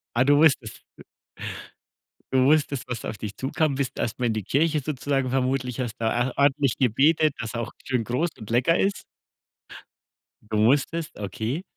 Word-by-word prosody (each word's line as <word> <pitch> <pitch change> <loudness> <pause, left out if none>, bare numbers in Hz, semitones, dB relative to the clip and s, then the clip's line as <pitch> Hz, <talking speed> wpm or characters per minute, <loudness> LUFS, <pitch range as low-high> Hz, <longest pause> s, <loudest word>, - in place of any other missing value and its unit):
Ah, 125 - +4
du 145 +1 +5
wusstest, 135 -8 +3 0.2
w - - -11 1.3
Du 130 -1 +4
wusstest, 145 -2 +2
was 120 -3 -4
auf 105 - -5
dich 105 0 -6
zukommt, 140 +2 0
bist 140 -2 -3
erst 115 +2 -3
mal 120 - +1
in 115 - +1
die 110 -3 -3
Kirche 155 +6 +2
sozusagen 135 -2 -1
vermutlich, 130 -1 -1
hast 120 -1 -3
da 110 -1 0 0.2
er 130 - -9
ordentlich 140 -2 +2
gebetet, 145 +5 +3
dass 115 0 -4
auch 120 - -4
schön 125 -4 -1
groß 130 +10 0
und 110 0 -10
lecker 130 +9 +3
ist. 195 +1 0 1.5
Du - - +1
musstest, 145 +8 +1
okay. 110 - -3
130 Hz, 170 wpm, -25 LUFS, 115-145 Hz, 1.5 s, du